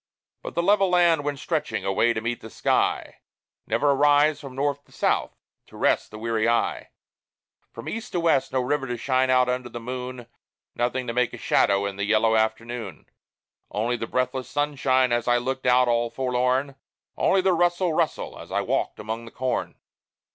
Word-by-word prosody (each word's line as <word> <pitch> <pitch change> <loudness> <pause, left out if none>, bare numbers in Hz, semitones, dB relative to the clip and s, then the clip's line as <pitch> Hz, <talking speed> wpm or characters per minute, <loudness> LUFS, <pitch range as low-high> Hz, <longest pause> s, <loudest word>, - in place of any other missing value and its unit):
But - - -8
the 170 - +1
level 195 0 +4
land 170 -4 +3
went 145 -1 -2
stretching 150 - -2
away 100 +5 +2
to 110 - -3
meet 115 +1 -3
the 110 - -9
sky - - 0 0.5
Never 130 +6 +2
a - - +4
rise, 145 +2 +4
from 135 -3 -10
north 140 +1 -1
to - - -26
south, - - 0 0.3
to - - -14
rest - - +1
the 110 - -10
weary 115 0 0
eye! 120 - 0 0.8
From 115 - -10
east 230 +2 -5
to 175 - +1
west 165 -5 +2
no 130 0 +1
river 135 +2 -1
to 120 0 -3
shine 130 +1 +1
out 130 -1 +4
under 125 -1 -2
the 120 - -7
moon, 125 0 -6 0.5
Nothing 125 +2 -1
to 115 - -3
make 125 0 +1
a - - -6
shadow 100 0 +2
in 100 -1 -4
the 100 - -2
yellow 110 +2 +3
afternoon: 110 -3 -2 0.6
Only 115 +4 -1
the 115 -1 -4
breathless 130 0 -2
sunshine, 135 -3 +1
as 120 0 0
I 120 0 +4
looked 130 +1 -3
out, 125 0 +5
all 120 0 +1
forlorn; 130 +2 0 0.4
Only 190 - +3
the 185 0 +3
"rustle, 175 0 +1
rustle," - - -1
as - - -11
I - - +1
walked - - -2
among 110 +2 -5
the - - -9
corn. 130 +2 -3
125 Hz, 190 wpm, -25 LUFS, 115-145 Hz, 0.8 s, out